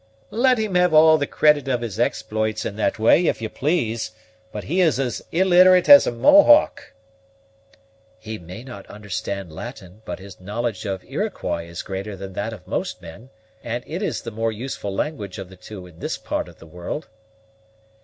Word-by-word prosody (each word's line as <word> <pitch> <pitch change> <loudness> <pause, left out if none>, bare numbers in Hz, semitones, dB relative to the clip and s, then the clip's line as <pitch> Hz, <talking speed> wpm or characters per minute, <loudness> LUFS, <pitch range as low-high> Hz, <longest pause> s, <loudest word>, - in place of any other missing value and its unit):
"Let 250 +3 +3
him 215 -3 -2
have 180 -2 +3
all 155 0 +7
the 145 - -1
credit 150 -3 +3
of 125 -3 0
his 115 -3 -5
exploits 110 -2 -1
in 100 - -4
that 110 - 0
way 115 +10 +4
if - - 0
you 110 -1 -4
please; 120 -5 -1 0.4
but 105 - -6
he 180 +5 0
is 160 -6 +3
as 125 -3 -2
illiterate 185 0 +5
as 285 0 +9
a - - +1
Mohawk." 295 - +5 1.2
"He 110 0 -7
may 90 +7 -10
not 120 -7 -10
understand 100 -3 -5
Latin, 105 -1 -9
but - - -6
his 95 -1 -13
knowledge 110 +3 -3
of 95 -2 -4
Iroquois 85 - -3
is 85 - -6
greater 100 +1 -5
than 95 0 -8
that 105 +4 -3
of 105 -5 -11
most - - -3
men, 100 +10 -12 0.3
and 120 +1 -4
it 170 +5 -5
is 205 - -2
the 115 - -6
more 115 +1 -1
useful 110 -2 -5
language 100 -4 -4
of 95 -2 -8
the 95 - -13
two 95 0 -10
in 85 -2 -16
this - - -3
part - - -3
of - - -17
the - - -14
world." 90 - -6
115 Hz, 185 wpm, -22 LUFS, 100-155 Hz, 1.2 s, as